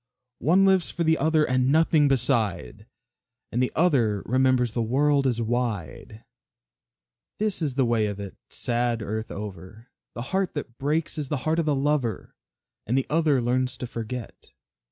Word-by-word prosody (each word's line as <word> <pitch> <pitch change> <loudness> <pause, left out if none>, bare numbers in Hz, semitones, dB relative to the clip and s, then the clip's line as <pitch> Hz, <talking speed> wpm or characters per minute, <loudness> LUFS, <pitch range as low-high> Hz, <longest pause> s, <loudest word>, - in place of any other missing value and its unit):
One 180 - +4
lives 190 -2 +3
for 170 - -2
the 160 0 +2
other 155 +1 +3
and 130 +1 +2
nothing 155 -1 +4
beside, 115 -6 -1 0.6
And 120 - 0
the 125 - +1
other 120 - +2
remembers 130 -1 +2
the 120 - -2
world 140 +4 +2
is 120 -2 0
wide. 110 -3 -3 1.1
This 210 -4 0
is 145 -5 -1
the 135 -2 +2
way 115 -2 +1
of 100 -1 -5
it, 100 -2 -7
sad 120 -1 -1
earth 110 +1 -4
over, 105 +3 -9 0.2
The 120 - -4
heart 190 -3 0
that 120 -5 -6
breaks 155 +3 -1
is 145 - -3
the 145 - -1
heart 160 +1 +1
of 160 - -1
the 150 - +2
lover, 135 -4 -1 0.5
And 125 +4 +1
the 135 - +1
other 155 -4 +3
learns 125 +1 0
to - - -5
forget. 115 0 -7
125 Hz, 165 wpm, -25 LUFS, 115-150 Hz, 1.1 s, One